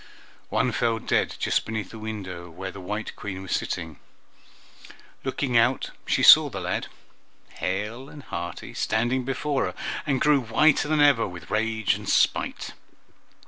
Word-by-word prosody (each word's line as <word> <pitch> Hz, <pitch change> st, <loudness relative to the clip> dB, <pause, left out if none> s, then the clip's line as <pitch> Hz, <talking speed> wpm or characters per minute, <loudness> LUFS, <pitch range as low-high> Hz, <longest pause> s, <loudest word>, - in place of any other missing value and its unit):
One -, -, +1 dB
fell 115 Hz, -1 st, +1 dB
dead -, -, 0 dB
just -, -, +1 dB
beneath 110 Hz, -1 st, -5 dB
the 110 Hz, -, -9 dB
window 95 Hz, -5 st, -6 dB
where 95 Hz, +3 st, -7 dB
the 100 Hz, -, -10 dB
white 105 Hz, +4 st, -5 dB
Queen 95 Hz, -2 st, -6 dB
was 95 Hz, -, -8 dB
sitting. 80 Hz, -3 st, -3 dB, 1.2 s
Looking 130 Hz, -4 st, -2 dB
out, 125 Hz, +3 st, +1 dB, 0.2 s
she -, -, +1 dB
saw 155 Hz, -2 st, +9 dB
the 100 Hz, -6 st, -5 dB
lad, 90 Hz, 0 st, -2 dB, 0.7 s
hale 105 Hz, +8 st, -3 dB
and 145 Hz, -2 st, -11 dB
hearty, 85 Hz, -1 st, -6 dB
standing 120 Hz, +4 st, 0 dB
before 135 Hz, -1 st, -1 dB
her, 90 Hz, -, -4 dB, 0.3 s
and 135 Hz, -3 st, +1 dB
grew 150 Hz, 0 st, +4 dB
whiter 145 Hz, +6 st, +3 dB
than 155 Hz, -1 st, +2 dB
ever 140 Hz, -6 st, +5 dB
with 90 Hz, -2 st, -10 dB
rage 110 Hz, -1 st, +1 dB
and -, -, -6 dB
spite. -, -, +1 dB
110 Hz, 150 wpm, -25 LUFS, 95-130 Hz, 1.2 s, saw